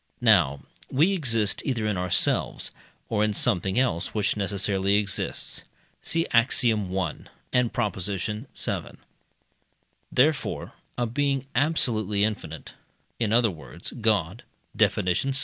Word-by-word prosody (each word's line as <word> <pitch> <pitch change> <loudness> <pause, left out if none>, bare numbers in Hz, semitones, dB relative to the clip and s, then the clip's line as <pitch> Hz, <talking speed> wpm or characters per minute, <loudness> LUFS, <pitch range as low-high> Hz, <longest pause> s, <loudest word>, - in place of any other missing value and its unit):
Now 70 +1 +4 0.3
we 160 +9 +3
exist 115 - 0
either 120 -5 -1
in 105 -2 0
ourselves, 90 -1 +1 0.4
or 105 -2 +1
in 105 -1 0
something 95 +2 +2
else 115 -10 +1
which 105 -1 +1
necessarily 100 0 +1
exists 100 -1 -1 0.4
(see 165 0 +1
Axiom. 115 -5 +2
i. 90 -5 -1 0.4
and 125 -2 +2
Prop. 105 -4 -1
vii.). 105 +5 -3 1.6
Therefore 145 +3 +1 0.2
a 120 - +1
being 135 +2 0
absolutely 110 - +1
infinite 90 -8 -4 0.5
in 110 -3 0
other 115 -2 +4
words, 75 -8 -8
God - - 0 0.3
(Def. - - +3
vi.) 90 +10 0
105 Hz, 115 wpm, -26 LUFS, 95-125 Hz, 1.6 s, Now